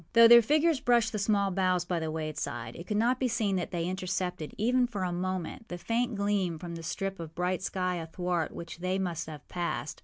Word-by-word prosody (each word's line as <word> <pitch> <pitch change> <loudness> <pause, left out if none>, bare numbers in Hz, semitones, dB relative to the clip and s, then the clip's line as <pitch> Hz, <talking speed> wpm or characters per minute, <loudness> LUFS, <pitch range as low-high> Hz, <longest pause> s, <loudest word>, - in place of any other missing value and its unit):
Though 230 0 +9
their 235 0 +10
figures 305 +5 +3
brushed 235 -2 +3
the 215 - -2
small 200 -1 +2
boughs 185 -1 +1
by 175 -2 -1
the 160 -1 -2
wayside, 155 -7 -4
it 170 - -9
could 210 - 0
not 245 +4 +2
be 260 - +2
seen 220 -4 0
that 175 - -2
they 170 -2 -2
intercepted, 185 -3 -3
even 245 +3 +3
for 205 -6 -4
a 180 - -1
moment, 185 +5 -3
the 175 - -5
faint 230 +6 -1
gleam 200 -4 0
from 170 +1 -7
the 165 - -6
strip 195 +3 -3
of 165 -1 -8
bright 180 +1 0
sky 185 -1 -1
athwart 170 0 -2
which 170 0 -8
they 185 +1 0
must 175 -4 -2
have 155 -2 -9
passed. 175 -3 -3
185 Hz, 220 wpm, -29 LUFS, 170-215 Hz, -, their